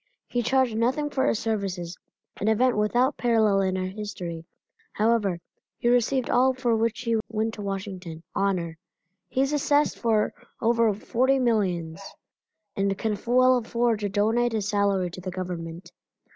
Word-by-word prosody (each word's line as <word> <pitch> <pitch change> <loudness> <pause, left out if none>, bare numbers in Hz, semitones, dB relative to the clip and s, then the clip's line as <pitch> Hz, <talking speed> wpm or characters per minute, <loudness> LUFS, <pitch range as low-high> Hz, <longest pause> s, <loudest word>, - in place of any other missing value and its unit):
He 245 - -1
charged 255 -1 +2
nothing 265 +6 0
for 265 - +1
his - - +2
services, 195 -6 -3 0.4
an 205 - -2
event 240 +3 +3
without 240 +6 +2
parallel 220 -4 +3
in 190 -1 0
our 185 - -1
history, 185 -4 -6 0.5
however, 210 -5 +1 0.4
he 240 - +1
received 245 +1 +2
all 260 +1 +3
for 245 -3 +1
which 225 +1 0
he 230 -2 +1
went 220 0 -1
to 210 - -7
Washington 190 -4 -5
honor. 175 -5 -1 0.5
He 260 - 0
is 275 +2 +1
assessed 290 0 +2
for 220 -3 +1 0.3
over 230 -1 +3
forty 255 +6 +1
millions, 190 -9 0 0.7
and 195 0 0
can 220 0 -1
well 255 +1 +5
afford 235 -1 0
to 205 -1 -2
donate 225 +4 +1
his 210 -3 -1
salary 200 -4 +1
to 185 - -9
the 185 - -5
Government. 175 -1 -6
220 Hz, 155 wpm, -26 LUFS, 190-240 Hz, 0.7 s, well